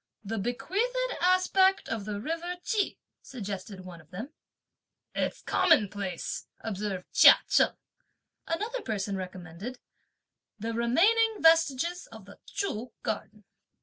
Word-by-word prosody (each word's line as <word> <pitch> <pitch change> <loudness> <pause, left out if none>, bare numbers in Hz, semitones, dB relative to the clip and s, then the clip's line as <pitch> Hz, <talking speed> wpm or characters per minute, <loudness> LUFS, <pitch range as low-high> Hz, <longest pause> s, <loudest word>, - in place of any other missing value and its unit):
"The 220 +1 -3
bequeathed 400 - -1
aspect 375 +2 +3
of 220 -3 -3
the 210 -1 -4
river 330 +8 -3
Ch'i!" 425 -3 0 0.2
suggested 200 -5 -6
one 175 -2 -10
of 155 - -24
them. 225 - -7 0.8
"It's - - -2
commonplace," 205 - +1
observed 200 -3 -4
Chia - - +9
Cheng. - - +3 0.7
Another 435 +9 -2
person 200 - -2
recommended 185 +5 -7 0.8
"the 225 +2 -4
remaining 400 - +3
vestiges 330 +1 +3
of - - -12
the - - -14
Chü 245 - -3
Garden." 215 -1 -4
240 Hz, 115 wpm, -29 LUFS, -, 0.8 s, Chia